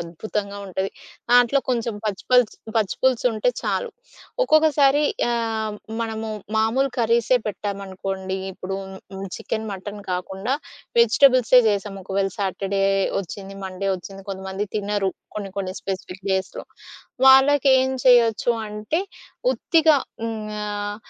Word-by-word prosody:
అద్భుతంగా 200 +4 -4
ఉంటది. 190 +1 -2 0.4
దాంట్లో 245 +3 +5
కొంచెం 235 -2 -1
పచ్చిపల్స్ 220 +3 +2 0.2
పచ్చిపులుసుంటే 235 +1 +1
చాలు. - - -1 0.6
ఒక్కొక్కసారి 300 - +4 0.3
ఆహ్, 225 -2 -1 0.3
మనము 220 -1 -4 0.3
మామూలు 250 +5 +2
కర్రీసే 235 +2 +3
పెట్టామనుకోండి, 195 -2 -4
ఇప్పుడు 190 +1 -5 0.4
హ్మ్, 195 0 -5
చికెను, 220 0 -4
మటను 205 +1 -7
కాకుండా 190 +7 -2 0.5
వెజిటబుల్సే 250 +1 +6
చేసాం. 200 -1 -2
ఒకవేళ 195 0 -1
సాటర్‌డే 195 0 -1 0.4
వచ్చింది, 195 +1 -8
మన్‌డే 190 +1 -3
వచ్చింది. 195 +2 -10
కొంతమంది 190 +1 -4
తినరు, 205 -2 0 0.3
కొన్ని 200 -2 -4
కొన్ని 185 -1 -3
స్పెసిఫిక్ 190 0 -6
డేస్‌లో. 190 0 -2 0.6
వాళ్ళకేం 265 -1 +6
చేయొచ్చు 240 -2 +5 0.2
అంటే 210 +9 -2 0.5
ఉత్తిగా 320 -9 +4 0.3
హ్మ్, 225 -1 -3 0.2
ఆహ్, 205 0 -3
210 Hz, 105 wpm, -23 LUFS, 195-245 Hz, 0.6 s, వెజిటబుల్సే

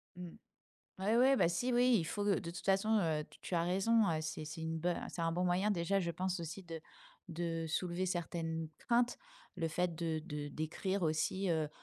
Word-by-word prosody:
Mmh. 180 -1 -7 0.7
Ouais, 210 +4 +2
ouais, 265 +3 +6
bah 170 - +4
si, 245 +9 0
oui, 245 0 +5
il 165 - 0
faut, 205 +5 -2
heu, 200 -2 +3
de 170 - -5
toute 175 - -8
façon, 205 +3 +3
heu, 155 -4 0
tu - - -17
tu - - -4
as 170 - +3
raison, 200 +5 +3
heu, 160 - +1
c'est 155 0 -4
c'est 160 +2 -7
une 160 0 -2
bo 175 +3 +1 0.2
c'est 170 - -4
un 165 0 +1
bon 180 +2 0
moyen 180 +4 +2
déjà, 195 +1 +1
je 170 -2 -1
pense 185 +1 -2
aussi, 165 +3 -6
de 165 -2 -7 0.5
de 165 -1 -2
soulever 175 +3 -1
certaines 165 -2 -2
craintes. 240 0 +2 0.4
Le 165 -2 0
fait 175 +2 0
de 160 -1 -1
de 150 -3 -4
d'écrire 185 +6 -2
aussi, 165 +4 +1
heu 160 -2 +1
175 Hz, 215 wpm, -35 LUFS, 160-195 Hz, 0.7 s, ouais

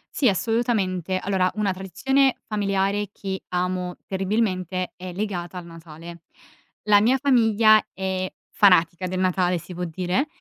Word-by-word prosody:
Sì, 265 - +2
assolutamente. 195 -4 0
Allora, 185 -1 0
una 210 -2 0
tradizione 265 - +1
familiare 200 -1 0
che 190 -2 -5
amo 180 0 -2
terribilmente 190 -2 -1
è 180 -1 -8
legata 185 -3 -4
al 180 - -7
Natale. 165 0 -11 0.6
La 210 -1 +5
mia 250 +5 +3
famiglia 225 -5 +4
è 190 -1 -3 0.2
fanatica 180 -2 +3
del 185 0 -3
Natale, 180 -1 +1
si 180 - -11
può 180 +1 -4
dire, 180 - -1
190 Hz, 135 wpm, -23 LUFS, 180-210 Hz, 0.6 s, La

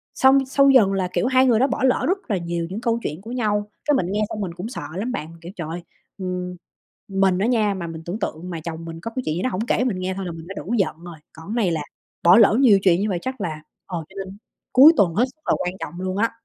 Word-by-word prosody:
xong 270 +1 +5
sau 275 +1 +4
dần 225 -8 +5
là, 190 -2 0
kiểu, - - +1
2 260 0 +4
người 235 -4 +4
đó 265 - +4
bỏ 280 - -2
lỡ 260 -1 +2
rất 375 - +2
là 200 - +2
nhiều 170 -1 -3
những 200 +4 -5
câu 235 -1 0
chuyện 155 +5 -4
của 225 - -9
nhau. 210 -4 0 0.2
Cái 295 - +3
mình 185 - +1
nghe 210 +1 0
xong 215 - -4
mình 180 -4 -3
cũng 180 +5 -6
sợ 250 - -6
lắm 220 +7 -2
bạn, 160 -11 -4
kiểu, 170 - -8
trời 165 -4 -5
ơi, 170 +2 -5 0.4
ừm, 180 -1 -4 0.5
mình 195 -2 +2
á 205 - +1
nha 215 -5 +2
mà 175 -3 -5
mình 165 -1 -7
tưởng 175 +6 -4
tượng 180 -3 -4
mà 165 -2 -5
chồng 165 -1 -6
mình 165 0 -8
có 230 - -5
cái 255 - -1
chuyện 155 - 0
gì 175 - -2
đó 255 - 0
hổng 220 +4 -3
kể 250 - +1
mình 225 -8 -1
nghe 185 +1 -2
thôi 195 - -4
là 175 - -4
mình 165 0 -10
đã 195 - -7
đủ 235 - -3
giận 195 - 0
rồi, 175 -2 -9 0.2
còn 160 +2 -13
cái 215 - -3
này 180 - +2
là 160 - -1 0.4
bỏ 175 +6 +7
lỡ 220 -1 +6
nhiều 220 -7 +6
chuyện 185 -2 +4
như 210 - 0
vậy 185 -4 -1
chắc 260 -2 -5
là 155 -5 -4 0.2
ờ, 180 -3 -4
cho 190 - -19
nên 190 +2 -11 0.3
cuối 280 +5 +9
tuần 175 -5 +3
hết 235 +7 +3
sức 310 - -44
là - - +3
quan 180 - -2
trọng - - -6
luôn 185 0 -3
á. 230 +2 +2
195 Hz, 295 wpm, -22 LUFS, 175-235 Hz, 0.5 s, cuối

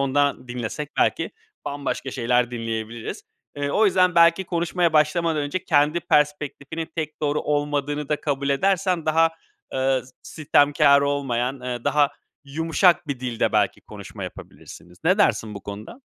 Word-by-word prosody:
ondan 140 -1 0
dinlesek 125 +5 -5
belki - - +1 0.3
bambaşka 140 -1 -4
şeyler 125 0 +1
dinleyebiliriz. 115 -1 -5 0.3
Eee, 145 0 -2
o 215 +8 +3
yüzden 180 -2 +3
belki 170 +2 +5
konuşmaya 175 -1 0
başlamadan 155 0 +2
önce 145 +6 -3
kendi 150 +2 +2
perspektifinin 150 +1 -1
tek 155 -2 -4
doğru 150 0 0
olmadığını 145 0 -1
da 150 -1 -1
kabul 140 -1 -2
edersen 180 +3 +1
daha, 165 +1 +4 0.4
eee, 130 -1 +1
s 130 - -18
sitemkâr 145 -2 +3
olmayan, 135 -2 -1
eee, 125 -1 -5
daha 145 -1 +3 0.3
yumuşak 165 +4 +2
bir 135 -3 -3
dilde 125 -3 -1
belki - - +1
konuşma - - -9
yapabilirsiniz. 90 0 -12
Ne 185 +5 +3
dersin 110 - +1
bu 100 - -8
konuda? 105 - -9
145 Hz, 140 wpm, -23 LUFS, 130-160 Hz, 0.4 s, belki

